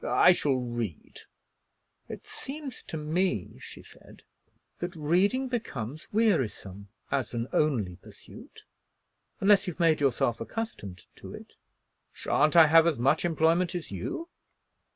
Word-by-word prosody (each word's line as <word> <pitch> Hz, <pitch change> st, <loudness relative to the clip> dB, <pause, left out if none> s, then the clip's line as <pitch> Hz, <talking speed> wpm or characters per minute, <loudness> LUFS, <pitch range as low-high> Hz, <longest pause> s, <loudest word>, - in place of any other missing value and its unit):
"I -, -, +5 dB
shall 145 Hz, -6 st, +1 dB
read." 120 Hz, -8 st, -5 dB, 0.9 s
"It -, -, -8 dB
seems 275 Hz, -2 st, -8 dB
to 160 Hz, -, -5 dB
me," 155 Hz, -, -2 dB
she -, -, -11 dB
said, -, -, -17 dB, 0.6 s
"that 175 Hz, +1 st, -5 dB
reading 185 Hz, -, +1 dB
becomes 155 Hz, -, -5 dB
wearisome 125 Hz, -, 0 dB, 0.2 s
as 135 Hz, -3 st, -2 dB
an 115 Hz, +1 st, -2 dB
only 110 Hz, -, 0 dB
pursuit, -, -, -15 dB, 0.8 s
unless 200 Hz, 0 st, +4 dB
you've 180 Hz, -1 st, -5 dB
made 165 Hz, -3 st, +3 dB
yourself 120 Hz, -3 st, +1 dB
accustomed 100 Hz, -, -6 dB
to -, -, -10 dB
it." -, -, -13 dB, 0.6 s
"Sha'n't 155 Hz, +2 st, +1 dB
I 165 Hz, -2 st, +9 dB
have 165 Hz, +2 st, +6 dB
as 165 Hz, -, +1 dB
much 135 Hz, +6 st, +2 dB
employment 170 Hz, +1 st, +1 dB
as 170 Hz, -, -6 dB
you?" 100 Hz, -, -5 dB
155 Hz, 130 wpm, -28 LUFS, 120-180 Hz, 0.9 s, I